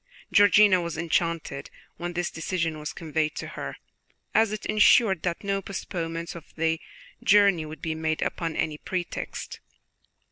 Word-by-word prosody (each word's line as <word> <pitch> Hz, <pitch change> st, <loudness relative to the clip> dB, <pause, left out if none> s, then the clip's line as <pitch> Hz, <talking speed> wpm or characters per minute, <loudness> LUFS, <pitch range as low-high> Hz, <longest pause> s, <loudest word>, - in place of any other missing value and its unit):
Georgiana 205 Hz, -2 st, +6 dB
was 170 Hz, -2 st, -4 dB
enchanted 165 Hz, -4 st, -1 dB, 0.3 s
when 175 Hz, +1 st, -4 dB
this 175 Hz, 0 st, -1 dB
decision 165 Hz, -1 st, -2 dB
was 150 Hz, -, -4 dB
conveyed 155 Hz, -2 st, -2 dB
to -, -, -5 dB
her, -, -, -6 dB, 0.6 s
as 220 Hz, -1 st, +4 dB
it 215 Hz, 0 st, -5 dB
ensured 210 Hz, -3 st, +5 dB
that 175 Hz, +1 st, -2 dB
no 195 Hz, 0 st, 0 dB
postponement 170 Hz, -3 st, -4 dB
of 170 Hz, -2 st, -12 dB
the 160 Hz, 0 st, 0 dB, 0.4 s
journey 200 Hz, -6 st, +5 dB
would 155 Hz, -1 st, -10 dB
be 160 Hz, -, -1 dB
made 160 Hz, 0 st, -1 dB
upon 165 Hz, -2 st, -2 dB
any 150 Hz, -1 st, -1 dB
pretext. 180 Hz, -2 st, -4 dB
170 Hz, 145 wpm, -26 LUFS, 160-190 Hz, 0.6 s, Georgiana